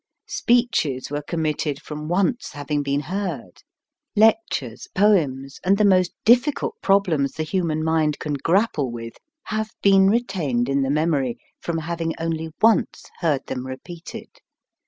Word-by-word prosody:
Speeches 230 - +1
were 145 0 -2
committed 150 -2 -2
from 150 0 -7
once 195 +7 0
having 145 0 -2
been 140 0 -1
heard, 165 - -5 0.5
lectures, 215 - +2
poems, 145 -10 +2
and 195 +2 +3
the 210 - +3
most 185 -2 +4
difficult 275 - +3
prob 195 0 +4
lems 140 -6 0
the 160 - -2
human 155 -2 -1
mind 155 -2 +1
can 150 - -4
grapple 165 - +1
with, 115 -1 -7 0.3
have 220 0 -3
been 195 -1 +6
retained 180 - 0
in 140 0 +1
the 135 - 0
mem 155 +3 +1
ory 130 -4 -1 0.2
from 170 -1 -3
having 165 0 -3
only 160 0 -2
once 225 -2 +3 0.2
heard 155 -6 0
them 125 0 -5
repeated. 165 +6 -9
160 Hz, 145 wpm, -23 LUFS, 140-195 Hz, 0.5 s, been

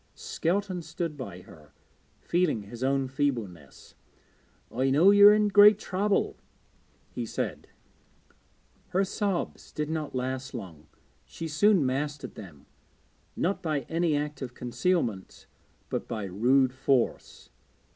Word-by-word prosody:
Skelton 185 +1 -2
stood 165 -1 -4
by 100 -10 -8
her, 75 -4 -17 0.5
feeling 170 - 0
his 115 +5 -8
own 135 0 +1
feebleness. 115 - -4 0.8
'I 130 +3 0
know 160 +9 +6
you 205 0 +8
are 210 - +9
in 210 0 +2
great 205 +1 +7
trouble,' 200 0 -1 0.7
he - - -4
said. - - -4 1.2
Her 190 0 +1
sobs 195 -2 -3
did 150 0 -3
not 155 -4 -4
last 130 +1 -3
long; 85 -9 -9 0.4
she 165 - -7
soon 165 +1 +3
mastered 140 +3 -3
them, 85 -9 -12 0.7
not 190 +4 -1
by 155 -5 -1
any 160 +3 0
art 150 -1 -4
of 125 -2 -6
concealment 120 - -2 0.5
but - - -3
by 110 -3 -4
rude 125 +7 +2
force. 130 -1 -1
145 Hz, 125 wpm, -28 LUFS, 120-175 Hz, 1.2 s, are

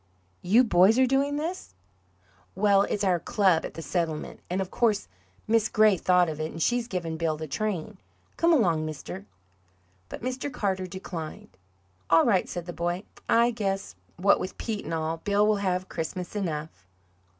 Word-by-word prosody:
"You 220 +8 +5
boys 200 0 +5
are 260 - +5
doing 275 +2 +1
this?" 320 - -5 0.8
"Well, 200 0 +4
it's 205 - -1
our 180 -3 +2
club 185 -2 +2
at - - -8
the 165 - -6
settlement, 165 -4 -3
and 180 +2 -1
of 190 -1 -3
course 215 -4 +1 0.4
Miss 225 0 +2
Gray 215 -2 +5
thought 180 0 +3
of 155 -1 -5
it, 155 0 -2
and 165 - -8
she's 240 +7 +1
givin' 170 -6 -3
Bill 160 -1 -1
the 155 - -5
train. 205 +3 -3 0.4
Come 335 +1 +3
along, 175 - +3
mister." 105 - -7 0.8
But - - -8
Mr. 255 +3 -3
Carter 190 -6 -2
declined. 170 - -7 0.5
"All 165 0 +6
right," 200 -6 +2
said 175 -1 -5
the 175 - -6
boy. 175 +3 -2 0.3
"I 235 +1 +4
guess, 195 - -3 0.2
what 195 +3 +4
with 185 - -5
Pete 220 -3 -4
and - - -4
all, 160 +1 -2
Bill 205 +4 +2
will 215 -1 +3
have 185 -2 -1
Christmas 175 +4 -5
enough." 155 - -4
185 Hz, 170 wpm, -27 LUFS, 165-215 Hz, 0.8 s, All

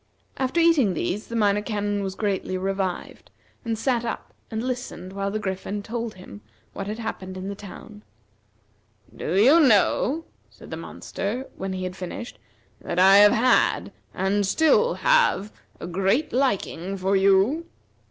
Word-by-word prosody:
After 265 +5 0
eating 305 - +4
these 180 - -2
the 230 - -6
Minor 205 -2 +2
Canon 205 -1 -2
was 190 -1 -4
greatly 195 -3 -2
revived, 190 -1 -3 0.3
and 225 -1 -2
sat 240 +1 0
up 235 - -5 0.2
and 220 0 -3
listened 245 -7 -5
while 195 0 -2
the 210 - -2
Griffin 200 0 -4
told 230 0 -4
him 105 - -12 0.3
what 195 - -5
had 210 +1 -4
happened 190 -5 -6
in 190 +1 -5
the - - -3
town. 205 +1 -11 1.1
"Do 170 - -3
you 275 +10 +7
know," 275 - +3 0.2
said - - -15
the - - -3
monster, 235 +7 -5
when 190 0 -4
he 185 0 -4
had 185 0 -4
finished, 190 +6 -7 0.4
"that 170 - -5
I 190 +2 +7
have 205 0 +7
had, 250 +3 +2 0.2
and 200 +2 0
still 320 - +3
have, 485 - +2 0.3
a - - -6
great 195 - 0
liking 195 -7 -1
for 190 +1 +1
you?" 195 - +3
205 Hz, 155 wpm, -24 LUFS, 190-235 Hz, 1.1 s, you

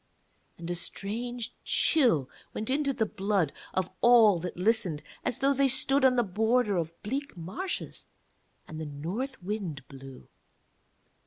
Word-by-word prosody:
And 170 - -8
a - - +1
strange 230 +7 -3
chill 235 - +3 0.3
went 220 +4 -2
into 280 0 +1
the 230 -4 0
blood 195 -6 0 0.2
of 185 -2 -1
all 225 -6 +6
that 175 +1 -6
listened, 185 -6 +1 0.2
as 245 - -1
though 275 +1 +3
they 275 0 +3
stood 270 +1 +3
on 260 -1 +5
the 240 - +3
border 220 +2 +1
of 165 0 -3
bleak 275 +2 -4
marshes 190 - -5 0.6
and 155 - -7
the 160 - -4
North 180 - -5
Wind 180 -9 -4
blew. 135 -1 -12
215 Hz, 145 wpm, -29 LUFS, 170-250 Hz, 0.6 s, all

